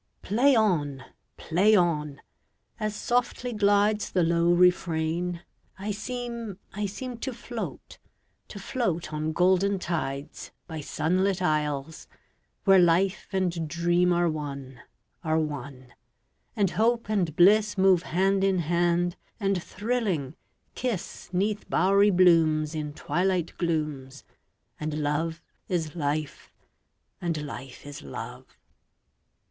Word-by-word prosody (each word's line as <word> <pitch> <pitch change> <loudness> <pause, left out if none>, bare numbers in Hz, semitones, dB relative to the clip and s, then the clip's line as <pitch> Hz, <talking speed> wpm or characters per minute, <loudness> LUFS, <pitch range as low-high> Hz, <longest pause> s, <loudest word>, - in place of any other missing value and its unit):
1882.]PLAY 255 +7 +4
on! 150 - +1 0.3
Play 195 +6 +3
on! 150 -6 +1 0.6
As 215 -1 -2
softly 245 +1 -1
glidesThe 205 -3 +2
low 170 0 +2
refrain, 175 -1 +1 0.3
I 200 +2 -3
seem, 235 -1 -5 0.2
I 210 +1 -2
seemTo 245 +4 -5
float, 235 -1 -7 0.5
to - - -10
float 180 - -2
on 155 +1 -1
golden 190 +4 +3
tides, 155 -5 -4 0.2
By 160 -2 -6
sunlit 185 +6 0
isles, 150 -3 -1 0.6
where 195 -1 +6
life 180 +3 +2
and 190 -2 +1
dreamAre 175 +1 +1
one, 140 -4 -6 0.4
are 160 0 +1
one; 140 -5 -5 0.6
and 200 -4 +1
hope 235 +1 +1
and 185 -8 0
blissMove 195 -1 +5
hand 190 +3 +1
in 195 -1 +3
hand, 175 +1 +1 0.2
and 195 -3 0
thrilling, 195 - -2 0.4
kiss'Neath 205 -2 -3
bowery 200 +2 +4
blooms, 165 -4 +4
In 150 -2 -3
twilight 180 +1 -1
glooms, 150 -5 -2 0.6
And 150 0 -3
love 155 +2 -1 0.3
is 165 -4 -2
life, 150 -2 -3 0.7
and 165 -3 -1
life 135 -2 -9
is 145 -1 -8
love. 70 - -9
175 Hz, 105 wpm, -27 LUFS, 155-200 Hz, 0.7 s, where